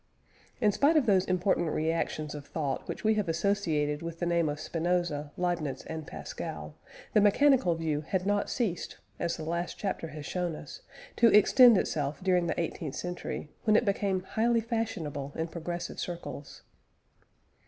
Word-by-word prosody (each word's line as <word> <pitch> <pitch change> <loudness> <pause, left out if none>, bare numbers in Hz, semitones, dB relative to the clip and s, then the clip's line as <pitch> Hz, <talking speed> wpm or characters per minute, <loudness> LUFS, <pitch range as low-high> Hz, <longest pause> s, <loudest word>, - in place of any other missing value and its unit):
In 210 -4 +4
spite 290 +9 +3
of 290 - +3
those 190 -3 +4
important 180 -2 +1
reactions 155 -1 -1
of 145 -1 -8
thought 140 -5 -3
which - - -5
we 220 0 +4
have 210 -5 -1
associated 160 -4 0
with 165 0 -5
the 175 - -2
name 170 -2 +2
of 145 +1 -4
Spinoza, 165 -3 -1
Leibniz, 170 -7 -1
and 160 -1 -6
Pascal, 75 0 -6 0.4
the 210 - +5
mechanical 210 -3 +4
view 155 -2 -1
had 180 +4 -2
not 205 0 +1
ceased, 215 -9 -2 0.2
as 170 -1 -1
the 160 - -6
last 170 +2 -3
chapter 190 -4 -3
has 150 -1 -8
shown 175 -1 -2
us, - - -10 0.4
to 235 - +6
extend 230 +2 +7
itself 145 -5 -1
during 180 -2 +2
the - - -1
eighteenth 160 -3 -3
century, 175 -3 -5
when 215 -1 +4
it 235 - +4
became 195 -2 0
highly 230 +4 +1
fashionable 170 - -3
in 160 0 -2
progressive 175 +1 -5
circles. 170 -4 -6
170 Hz, 165 wpm, -29 LUFS, 155-200 Hz, 0.4 s, extend